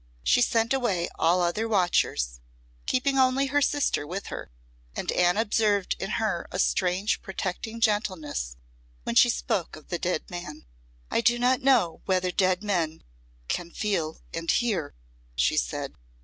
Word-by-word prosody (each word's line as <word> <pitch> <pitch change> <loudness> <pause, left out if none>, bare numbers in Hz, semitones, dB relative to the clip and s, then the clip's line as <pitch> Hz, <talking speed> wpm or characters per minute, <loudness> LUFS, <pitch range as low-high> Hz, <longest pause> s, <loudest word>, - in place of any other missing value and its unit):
She - - +4
sent 230 0 +2
away 205 -10 0
all 175 +2 +3
other 210 +6 0
watchers, 175 - +1 0.5
keeping 270 +1 +1
only 260 +1 +3
her 290 - +4
sister 285 - +1
with 190 +5 -5
her, - - -6 0.5
and - - -2
Anne 180 +1 +3
observed 210 -3 +1
in 195 - -3
her 210 -6 -1
a - - -3
strange 185 +2 +1
protecting 195 +4 -4
gentleness 185 - -1 0.5
when - - -2
she - - +6
spoke - - -1
of 155 - -15
the 175 - -2
dead 180 -2 -1
man. 175 - -8 0.5
"I - - +2
do 240 +1 +3
not 250 +2 +2
know 255 -11 +3
whether 185 -1 +1
dead 185 +1 +1
men 170 -6 -1 0.4
can 175 -1 -2
feel 170 -5 -2
and 165 0 -4
hear," 205 - 0 0.4
she 60 0 +2
said. - - -2
185 Hz, 150 wpm, -27 LUFS, 170-225 Hz, 0.5 s, she